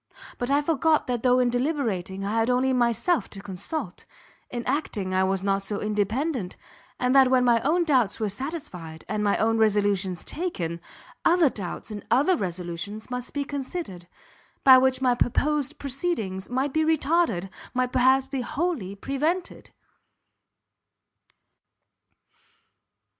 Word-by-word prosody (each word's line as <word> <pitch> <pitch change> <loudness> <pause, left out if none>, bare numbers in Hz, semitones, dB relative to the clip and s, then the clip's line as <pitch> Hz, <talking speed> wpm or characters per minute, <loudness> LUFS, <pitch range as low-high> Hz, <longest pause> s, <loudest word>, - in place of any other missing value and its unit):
but 245 - -2
I 285 +1 +3
forgot 320 0 +2
that 245 -2 -2
though 250 0 +4
in 250 -1 +2
deliberating 230 - -1
I 200 - -2
had 225 +2 +1
only 255 +1 +2
myself 245 +8 +1
to 200 - -9
consult, 195 - -6 0.4
in 240 -1 -5
acting 215 -9 -2
I 185 0 +3
was 190 0 0
not 195 0 +1
so 200 +1 -4
independent; 215 - -1 0.4
and 250 0 +2
that 265 -2 +6
when 255 -1 +4
my 235 -2 +4
own 345 +8 +2
doubts 255 -11 +2
were 215 - 0
satisfied, 195 - -6
and 210 +1 -2
my 200 -1 +2
own 225 +1 +1
resolutions 205 -4 +1
taken, 170 - -4 0.4
other 335 -5 +4
doubts 195 +2 -6
and 205 -1 -6
other 285 +10 +4
resolutions 185 - -5
must 250 0 -4
be 285 - -2
considered, 275 - -6 0.6
by 265 -1 +9
which 260 0 +1
my 250 -1 +4
purposed 295 +4 0
proceedings 270 - -3
might 265 +3 -1
be 315 - +2
retarded, 310 - +1 0.3
might 250 0 +1
perhaps 260 +1 +4
be 270 -1 -3
wholly 260 - -2
prevented!" 300 - -2
250 Hz, 140 wpm, -25 LUFS, 200-285 Hz, 0.6 s, by